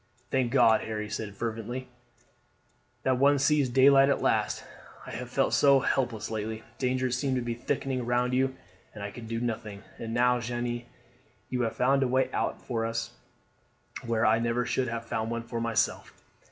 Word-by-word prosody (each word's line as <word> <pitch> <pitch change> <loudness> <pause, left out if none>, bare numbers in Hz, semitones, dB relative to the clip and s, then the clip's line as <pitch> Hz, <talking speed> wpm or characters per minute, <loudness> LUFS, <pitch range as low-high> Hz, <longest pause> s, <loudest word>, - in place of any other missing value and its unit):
"Thank 130 -3 +1
God," 115 -4 +5
Harry 105 -1 -4
said 100 -2 -4
fervently, 115 +4 -4 1.2
"that 130 -1 +2
one 140 +1 +5
sees 145 -1 +3
daylight 135 +2 +6
at 140 - +2
last! - - 0 0.4
I - - -8
have - - -6
felt - - +1
so 140 -1 +6
helpless 120 -6 -1
lately! 110 0 -4 0.2
Dangers 130 -1 0
seemed 130 +1 0
to 125 - 0
be 120 0 -2
thickening 130 +2 -2
round 125 +1 +1
you, 130 +1 +1 0.4
and 105 - -7
I 100 - -4
could 115 +1 -9
do 115 0 -2
nothing; 110 -3 -4 0.2
and 115 - -5
now, 125 +1 +3
Jeanne, 120 0 -3 0.7
you 125 -1 0
have 115 -2 -1
found 135 +2 +3
a 135 - +3
way 130 +1 +1
out - - -2
for 115 -2 -1
us 115 0 -2 0.9
where 115 -1 +1
I 110 +1 +4
never 115 +1 0
should 130 +1 0
have 115 0 -4
found 110 0 -2
one 115 0 -3
for 115 0 -4
myself." 115 -1 0
120 Hz, 180 wpm, -28 LUFS, 115-130 Hz, 1.2 s, daylight